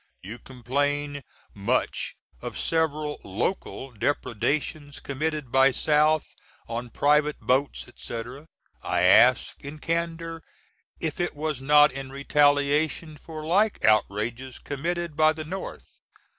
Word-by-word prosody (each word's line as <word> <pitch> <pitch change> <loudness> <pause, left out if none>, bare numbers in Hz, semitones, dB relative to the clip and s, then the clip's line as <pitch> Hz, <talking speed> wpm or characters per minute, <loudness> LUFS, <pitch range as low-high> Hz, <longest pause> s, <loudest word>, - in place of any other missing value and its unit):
You 110 +6 -8
complain 145 +3 -2 0.3
much 110 +6 -1 0.3
of - - -6
several 155 -2 0
(local) 130 - -3
depredations 145 +5 -2
com^td 150 -1 -3
by 135 +1 +6
South 150 +3 +2 0.3
on 120 +1 -4
private 150 +4 +2
boats 135 +3 0
&c. 115 -1 -5 0.6
I - - 0
ask, - - +5
in 145 +2 -7
candor, 165 0 -3 0.6
if 160 - -3
it 175 -3 -1
was 150 -2 -3
not 150 +2 +6
in 135 0 -6
retaliation 145 +2 +2
for 155 +1 -9
like 200 +6 +2
outrages 110 +4 +1
com^td 170 +3 -3
by 155 0 +4
the 155 0 -7
North. 190 +4 -6
145 Hz, 115 wpm, -26 LUFS, 130-155 Hz, 0.6 s, by